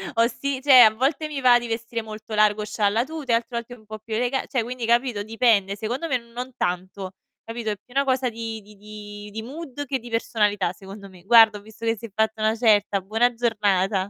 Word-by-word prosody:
Ho 230 +1 +4
si 270 +2 -4
cioè, 270 -2 +7
a 215 -1 +6
volte 275 +7 0
mi 290 -3 -5
va 245 -2 +6
di 240 - -6
vestire 230 0 -4
molto 215 0 -9
largo, 210 0 +3
scialla 210 +2 0
tuta, 300 -4 -5
e - - +6
altre 230 +1 -3
volte 235 +1 -6
un 220 -3 -20
po' 215 0 -8
più 220 +1 -8
elega 245 +3 -1
cioè, 250 -4 -1
quindi 245 0 -5
capito 235 -2 +1
dipende. 215 -3 +2
Secondo 245 +10 -3
me 260 -5 +1
non 240 +2 -8
tanto, 185 +1 -3 0.3
capito. 230 -1 -4
È - - -2
più 210 +5 -22
una 275 +1 +2
cosa 260 -1 +1
di 225 -1 -6
di 210 +1 -17
di 210 0 -10
di 220 - -5
mood 285 +3 -7
che 265 -1 -2
di 240 +1 -11
personalità 210 -5 0
secondo 195 +2 -12
me. 180 -2 -17
Guarda 225 0 +6
ho - - -12
visto 220 +2 -11
che 225 0 +1
si 230 - -9
è 230 - -9
fatta 220 0 0
una 215 +1 +2
certa, 210 -3 +2
buona 225 +6 +1
giornata. 205 -4 0
225 Hz, 230 wpm, -23 LUFS, 210-245 Hz, 0.3 s, cioè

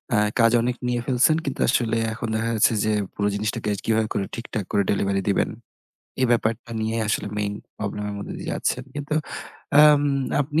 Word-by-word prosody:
আ - - +4 0.2
কাজ 115 -1 +6
অনেক 125 +1 0
নিয়ে 120 -1 0
ফেলছেন 130 +4 +3
কিন্তু 140 - -3
আসলে 115 -2 +1 0.2
এখন 115 +1 -4
দেখা 115 +1 0
যাচ্ছে 110 +1 +4
যে, 110 - +1 0.2
পুরো 100 - 0
জিনিসটাকে 105 0 -2 0.2
কিভাবে 110 -1 +2
করে 100 - -1
ঠিকঠাক 115 -3 -4
করে 100 - +3
delivery 100 -1 0
দিবেন 100 - +2 0.7
এই 130 - +4
ব্যাপারটা 115 0 0
নিয়ে 110 +1 -1
আসলে 110 - 0
main 105 -1 -1 0.3
problem 105 0 -3
এর - - -5
মধ্য 100 - -7
দিয়ে - - -5
যাচ্ছেন। - - -1
কিন্তু 145 +1 -3 0.7
আম 150 -1 +7 0.4
আপনি 145 +3 0
115 Hz, 180 wpm, -24 LUFS, 105-125 Hz, 0.7 s, আম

